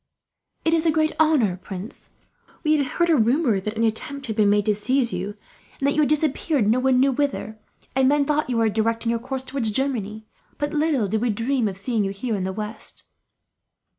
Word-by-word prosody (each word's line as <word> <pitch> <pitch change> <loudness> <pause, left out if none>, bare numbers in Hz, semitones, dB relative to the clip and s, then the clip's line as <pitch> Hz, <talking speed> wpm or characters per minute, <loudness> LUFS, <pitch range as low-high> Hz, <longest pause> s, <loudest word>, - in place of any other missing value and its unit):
"It 325 - +3
is 330 0 +2
a - - +5
great 310 0 +2
honour, 280 - +3
prince. 190 +2 -8 0.5
We 310 -1 +3
had 285 -3 +1
heard 345 +4 +1
a - - +5
rumour 240 -2 +2
that 210 +3 -4
an 230 - +1
attempt 275 +5 -2
had 220 -4 -3
been 210 -2 +3
made 205 0 +3
to 215 - +3
seize 235 +3 0
you; 190 +3 -4 0.4
and 275 - -2
that 285 - +3
you - - 0
had 300 - +3
disappeared, 300 -4 +1
no 230 +4 +3
one 255 0 +3
knew 270 +1 +4
whither, 255 -5 -2 0.4
and 265 0 +4
men 290 0 +3
thought 300 +1 +1
that - - -11
you 245 - 0
were 225 -1 +3
directing 225 +2 0
your 230 - 0
course 260 +2 -5
towards 265 -4 -1
Germany; 220 -3 -2 0.3
but 290 +1 -2
little 300 -8 +1
did 215 +2 -1
we 245 - +1
dream 230 +3 0
of 190 -2 -5
seeing 220 +1 -1
you 195 - -1
here, 220 +4 -3
in 190 -3 -1
the 190 - -2
west." 210 +3 -6
245 Hz, 225 wpm, -23 LUFS, 215-285 Hz, 0.5 s, a